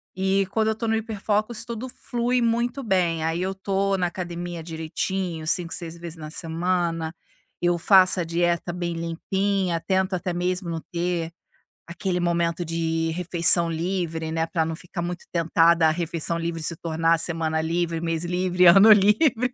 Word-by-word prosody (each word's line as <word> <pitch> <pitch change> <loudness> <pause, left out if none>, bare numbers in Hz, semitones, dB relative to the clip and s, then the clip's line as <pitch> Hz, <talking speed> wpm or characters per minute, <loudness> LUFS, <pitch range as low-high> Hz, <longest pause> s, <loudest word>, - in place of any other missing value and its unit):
e 190 +1 +1
quando 220 0 +1
eu 220 - 0
tô 230 +1 -4
no 225 - +2
hiperfocos 215 0 -2
tudo 235 +1 -5
flui 245 0 -1
muito 235 +3 0
bem, 175 -6 +1
aí 165 +2 -1
eu 190 +1 -1
tô 195 0 0
na 180 -1 +1
academia 175 -1 -5
direitinho 165 +1 -3
5, 165 +1 0
6 170 -1 -4
vezes 170 -1 -8
na 155 -1 -8
semana, 165 0 -2 0.5
eu 175 0 +2
faço 185 +1 +5
a - - +1
dieta 170 +1 0
bem 175 -1 -3
limpinha, 180 +2 -1
tento 190 +2 0
até 180 0 -2
mesmo 180 +1 -2
não 165 -1 -3
ter 170 -1 -2 0.6
aquele 180 +1 -2
momento 170 0 0
de 165 0 -1
refeição 170 0 +3
livre, 165 -1 -2
né, 160 0 0
pra 165 0 -1
não 160 0 -3
ficar 175 +1 -7
muito 175 +1 -5
tentada 165 0 +3
à - - +3
refeição 170 0 -2
livre 165 0 -3
se 165 +2 -1
tornar 165 0 +1
a - - +3
semana 160 -1 +1
livre, 165 +1 -1
mês 165 0 -2
livre, 180 +1 +1
ano 195 +5 +8
livre. 220 +5 +4
175 Hz, 170 wpm, -24 LUFS, 165-190 Hz, 0.6 s, ano